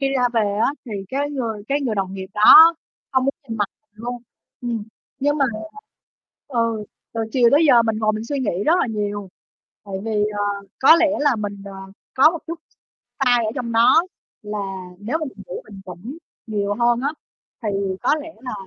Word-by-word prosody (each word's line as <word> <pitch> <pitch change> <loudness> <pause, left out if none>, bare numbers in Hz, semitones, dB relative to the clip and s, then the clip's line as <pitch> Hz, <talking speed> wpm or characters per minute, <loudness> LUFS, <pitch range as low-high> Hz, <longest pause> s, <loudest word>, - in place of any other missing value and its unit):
khi 275 - +1
ra 250 -1 +3
về 230 - +3 0.2
á - - +3
thì 230 - -8 0.2
cái 285 +4 -2
người 230 -7 -3
cái 285 +1 +1
người 245 -6 -1
đồng 195 -1 -2
nghiệp 190 -1 -6
đó 320 +11 +9 0.4
không 260 -1 +2
muốn 275 - 0
nhìn 225 - -4
mặt 205 -2 0 0.2
luôn, 240 +3 -6 0.4
ừm, 235 -4 -3 0.4
nhưng 290 +2 +1
mà, 275 - +4 1.0
ừ, 230 -4 -1 0.3
từ 225 - -1
chiều 245 -3 +5
tới 300 +3 +5
giờ 240 -4 +6
mình 225 -1 -1
ngồi 215 -1 +1
mình 215 +1 -4
suy 285 +2 -3
nghĩ 200 -6 -1
rất 315 - +5
là - - +1
nhiều, 205 -3 -3 0.6
tại 195 -1 -6
vì, 210 -2 0
ờ, 205 - 0 0.4
có 295 +5 +8
lẽ 335 -1 +4
là 290 -4 +3
mình, 205 -2 -5
ờ, 200 - -8 0.4
có 275 +4 +6
một 335 - -5
chút 335 0 -5
s - - -36 0.5
sai 245 -2 +3
ở 215 - -1
trong 240 -3 -4
đó 230 +8 +5 0.4
là 210 0 -5 0.4
nếu 235 +10 -2
mà 315 - -3
mình 210 -8 -9
đủ - - -6
bình 200 -2 -12
tĩnh 190 - -8 0.3
nhiều 205 -2 -1
hơn 240 +1 +2
á 280 +3 0 0.5
thì 220 - -2 0.3
có - - +3
lẽ 325 - -10
là 255 0 -6
230 Hz, 205 wpm, -21 LUFS, 210-275 Hz, 1.0 s, đó